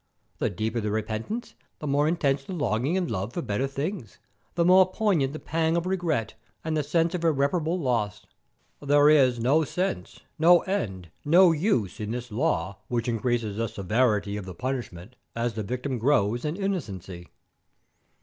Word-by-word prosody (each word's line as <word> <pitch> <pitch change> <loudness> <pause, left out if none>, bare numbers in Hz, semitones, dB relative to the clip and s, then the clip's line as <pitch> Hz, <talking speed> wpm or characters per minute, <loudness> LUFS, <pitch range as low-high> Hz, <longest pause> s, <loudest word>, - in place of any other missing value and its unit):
The - - +1
deeper 110 +5 -2
the 105 - -2
repentance, 110 - -3 0.2
the - - -8
more 145 +1 +2
intense 145 -5 +1
the 190 - -6
longing 140 - 0
and 185 - 0
love 100 +3 -3
for 175 - -2
better 115 +7 -1
things, 140 - -5 0.4
the 170 0 +2
more 185 +1 +6
poignant 185 -11 +1
the 155 - -6
pang 165 +1 0
of 170 - -1
regret 170 - -1 0.3
and 160 0 -2
the 155 - +1
sense 165 +4 +1
of 175 -2 -3
irreparable 160 +2 +1
loss. 105 - -1 0.6
There 145 +1 +5
is 130 -5 +4
no 140 +7 +3
sense, 150 - -3 0.2
no 175 +2 +6
end, 95 - -3
no 175 +4 +6
use, 150 - 0
in 105 -1 -4
this 120 +1 -5
law 100 - -1
which 120 -1 -2
increases 115 -2 -1
the 115 0 0
severity 105 0 0
of 100 - -6
the 95 -2 -8
punishment 120 -3 -5 0.2
as 115 0 -1
the 110 - -4
victim 125 +4 -3
grows 120 -2 +1
in 150 +2 -1
innocency. 100 - -4
135 Hz, 170 wpm, -26 LUFS, 110-165 Hz, 0.6 s, more